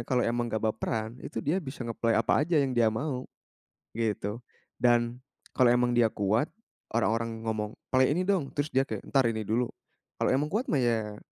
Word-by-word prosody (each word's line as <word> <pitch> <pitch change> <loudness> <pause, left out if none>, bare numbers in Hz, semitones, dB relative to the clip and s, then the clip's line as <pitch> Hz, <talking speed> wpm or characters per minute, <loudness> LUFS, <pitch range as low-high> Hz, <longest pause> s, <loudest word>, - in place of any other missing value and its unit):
kalau 125 -1 +2
emang 120 0 0
nggak 110 0 -2
baperan, 110 +2 -2
itu - - -5
dia 175 +7 +1
bisa 135 -4 -7
nge-play 115 -1 0
apa - - +3
aja 165 +2 +1
yang 135 -3 +2
dia 120 -2 +4
mau, 130 +3 -3 0.7
gitu. 105 -1 -1 0.4
Dan 120 0 +2 0.4
kalau 125 -2 +6
emang 120 0 +2
dia 120 - +6
kuat, 105 +8 +1 0.4
orang-orang 115 0 0
ngomong, 110 -1 -2 0.2
"Play 130 +2 +4
ini 180 - 0
dong!" 185 -7 0
Terus 145 +1 -1
dia 135 -1 +2
kayak, - - -5
"Entar 135 -2 +3
ini 115 -1 0
dulu." 115 +4 0 0.6
Kalau - - +3
emang 145 +7 +1
kuat 235 +5 0
mah, 150 - +2
ya 110 -4 0
120 Hz, 185 wpm, -29 LUFS, 110-135 Hz, 0.7 s, kalau